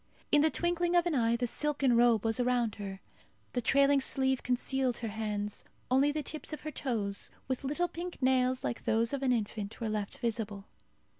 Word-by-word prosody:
In 295 Hz, -, +6 dB
the 315 Hz, -, +4 dB
twinkling 345 Hz, +1 st, 0 dB
of 350 Hz, 0 st, +4 dB
an 345 Hz, -, 0 dB
eye 235 Hz, -3 st, +2 dB
the 245 Hz, +1 st, 0 dB
silken 275 Hz, 0 st, +1 dB
robe 235 Hz, -2 st, +4 dB
was 225 Hz, +2 st, +1 dB
around 245 Hz, -3 st, +1 dB
her. 195 Hz, -1 st, -6 dB, 0.5 s
The 245 Hz, -, 0 dB
trailing 275 Hz, +3 st, +4 dB
sleeve 265 Hz, -1 st, +1 dB
concealed 255 Hz, 0 st, 0 dB
her 230 Hz, -, -4 dB
hands; 210 Hz, -1 st, -3 dB, 0.3 s
only 275 Hz, +3 st, +4 dB
the 305 Hz, 0 st, -2 dB
tips 310 Hz, +2 st, -6 dB
of 305 Hz, -, -5 dB
her 310 Hz, -, -5 dB
toes, 215 Hz, -8 st, -2 dB, 0.2 s
with 260 Hz, +1 st, -2 dB
little 295 Hz, +6 st, 0 dB
pink 350 Hz, +1 st, -6 dB
nails 255 Hz, -1 st, +2 dB
like 240 Hz, -, -3 dB
those 230 Hz, +3 st, +1 dB
of 275 Hz, -, -1 dB
an 265 Hz, -2 st, +2 dB
infant, 215 Hz, -3 st, -2 dB
were 225 Hz, -2 st, -2 dB
left 210 Hz, -2 st, -3 dB
visible. 215 Hz, -4 st, -3 dB
250 Hz, 195 wpm, -31 LUFS, 225-280 Hz, 0.5 s, In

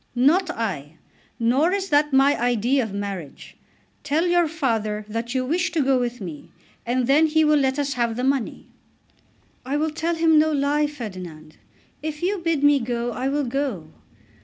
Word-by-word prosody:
"Not 320 Hz, +9 st, +3 dB
I. 165 Hz, -, -4 dB, 0.4 s
Nor 260 Hz, +8 st, +2 dB
is 390 Hz, -1 st, -2 dB
that 295 Hz, 0 st, +3 dB
my 275 Hz, +2 st, +4 dB
idea 245 Hz, +2 st, +2 dB
of 220 Hz, -4 st, -4 dB
marriage. 200 Hz, -7 st, -6 dB, 0.5 s
Tell 310 Hz, +4 st, +1 dB
your 350 Hz, -1 st, +3 dB
father 225 Hz, -9 st, -2 dB
that 230 Hz, +3 st, -4 dB
you 255 Hz, -1 st, 0 dB
wish 340 Hz, +5 st, 0 dB
to 315 Hz, -4 st, +2 dB
go 265 Hz, -1 st, +2 dB
with 245 Hz, 0 st, -3 dB
me, 170 Hz, -7 st, -8 dB, 0.4 s
and 250 Hz, +1 st, +1 dB
then 295 Hz, +5 st, +4 dB
he 315 Hz, 0 st, +2 dB
will 300 Hz, -1 st, +4 dB
let 265 Hz, 0 st, +1 dB
us 285 Hz, -1 st, -1 dB
have 235 Hz, -3 st, -1 dB
the 250 Hz, -, -3 dB
money." 265 Hz, -3 st, -1 dB, 1.0 s
"I 270 Hz, +3 st, -2 dB
will 310 Hz, +1 st, 0 dB
tell 330 Hz, +2 st, -2 dB
him 325 Hz, -1 st, +4 dB
no 315 Hz, +1 st, +3 dB
lie, 295 Hz, +1 st, +1 dB
Ferdinand. 185 Hz, -, -9 dB, 0.4 s
If 305 Hz, +1 st, -5 dB
you 390 Hz, +2 st, 0 dB
bid 330 Hz, -4 st, -1 dB
me 290 Hz, -1 st, +5 dB
go, 240 Hz, 0 st, -2 dB
I 255 Hz, +2 st, -3 dB
will 285 Hz, +1 st, 0 dB
go. 240 Hz, -, -3 dB
270 Hz, 180 wpm, -23 LUFS, 230-305 Hz, 1.0 s, me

